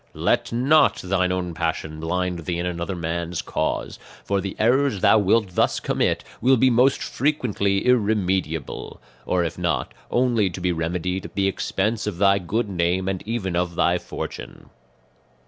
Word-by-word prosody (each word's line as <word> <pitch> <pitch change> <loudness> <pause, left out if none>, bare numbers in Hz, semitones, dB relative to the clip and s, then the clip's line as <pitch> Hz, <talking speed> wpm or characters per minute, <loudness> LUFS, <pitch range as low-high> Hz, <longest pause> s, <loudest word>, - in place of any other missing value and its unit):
"Let - - +1
not 140 +6 +4
thine 90 -1 0
own 90 -2 -2
passion 80 -2 -3
blind 90 0 -2
thee 85 -2 -2
in 85 - -2
another 90 +2 -3
man's 85 0 -3
cause; - - -2 0.3
for 100 -1 0
the 95 0 -5
errors 125 -1 +2
thou 110 - +6
wilt 105 +1 +2
thus - - +2
commit - - 0 0.2
will 130 +2 +5
be 130 +2 +4
most 125 +3 +3
frequently 110 -9 0
irremediable; 95 - 0 0.3
or 90 -1 +2
if 85 +1 -4
not, 75 -8 -1 0.2
only 120 -5 +2
to 90 - -7
be 90 0 0
remedied 90 +3 -2
at - - -10
the 100 -1 +2
expense 105 +3 -1
of 100 -5 -3
thy 100 +1 +4
good 105 +6 -1
name 90 0 0
and 95 -1 -2
even 105 -6 -2
of 90 -1 -1
thy 85 +1 +2
fortune. - - -8
95 Hz, 165 wpm, -23 LUFS, 85-110 Hz, 0.3 s, thou